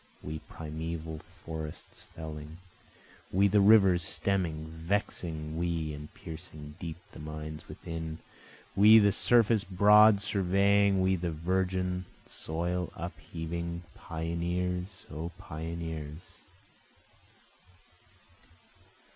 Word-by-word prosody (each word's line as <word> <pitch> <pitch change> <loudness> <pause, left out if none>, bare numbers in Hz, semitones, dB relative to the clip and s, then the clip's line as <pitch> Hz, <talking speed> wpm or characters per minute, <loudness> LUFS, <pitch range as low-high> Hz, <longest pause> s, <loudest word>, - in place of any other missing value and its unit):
We 80 +1 -4
primeval 80 0 -5
forests 80 -3 -8
felling, 80 0 -8 0.7
We 100 +2 +4
the 100 +1 +4
rivers 100 -4 +6
stemming, 85 -2 -1
vexing 80 -2 -2
we 85 -3 -1
and 75 +1 -8
piercing 80 -4 -9
deep 80 -2 -5
the - - -11
mines 75 0 -7
within, 80 -1 -6 0.6
We 105 +3 +9
the 100 -2 +6
surface 115 0 +4
broad 105 +2 +6
surveying, 100 0 +3
we 95 0 +3
the 85 0 -2
virgin 90 +2 -1 0.2
soil 85 +2 -3
upheaving, 85 +1 -5
Pioneers! 90 +3 -3
O 80 +3 -4
pioneers! 80 -3 -6
85 Hz, 90 wpm, -30 LUFS, 80-95 Hz, 0.7 s, We